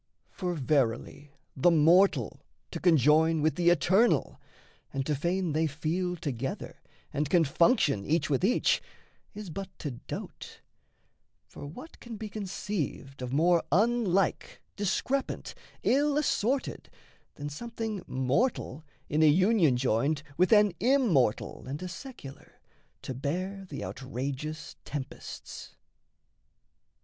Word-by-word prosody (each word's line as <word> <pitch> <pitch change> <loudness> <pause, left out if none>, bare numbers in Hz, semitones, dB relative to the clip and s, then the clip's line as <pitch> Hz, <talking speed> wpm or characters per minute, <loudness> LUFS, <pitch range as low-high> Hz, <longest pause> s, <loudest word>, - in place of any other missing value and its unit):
For, 180 -2 -3
verily, 140 -1 0 0.3
the 140 +6 +4
mortal 170 +4 +4 0.3
to - - -4
conjoin 160 0 +4
With 155 - +3
the 175 -1 +3
eternal, 185 - +3 0.5
and 135 -1 -2
to 150 - 0
feign 175 +4 -1
they 160 +1 +2
feel 165 +5 -2
Together, 135 -5 -5 0.3
and 145 0 -1
can 175 -3 +4
function 150 - +3
each 160 +5 +1
with 140 0 0
each, 230 +6 +3 0.5
Is 210 -4 -7
but 195 +3 -5
to 145 - -4
dote: 120 - -8 0.8
for 145 - -10
what 255 - -11
can 235 -2 -8
be 215 0 -6
conceived 190 -9 -4
Of 125 -1 -4
more 170 +4 +3
unlike, 200 -1 +1
discrepant, 215 +7 -2 0.3
ill 290 +2 +3
assorted, 270 -2 -1 0.5
Than 145 - -6
something 220 +4 -5
mortal 135 - 0 0.2
in 150 +2 +1
a 155 - +7
union 175 - +4
joined 135 +4 +1
With 180 +4 +2
an 210 -3 +6
immortal 205 - +2
and 140 +3 -4
a - - -3
secular 180 - -10 0.4
To 130 - -4
bear 185 +9 -4
the 140 - -5
outrageous 135 +4 -5
tempests? 140 -3 -7
165 Hz, 120 wpm, -29 LUFS, 140-200 Hz, 0.8 s, a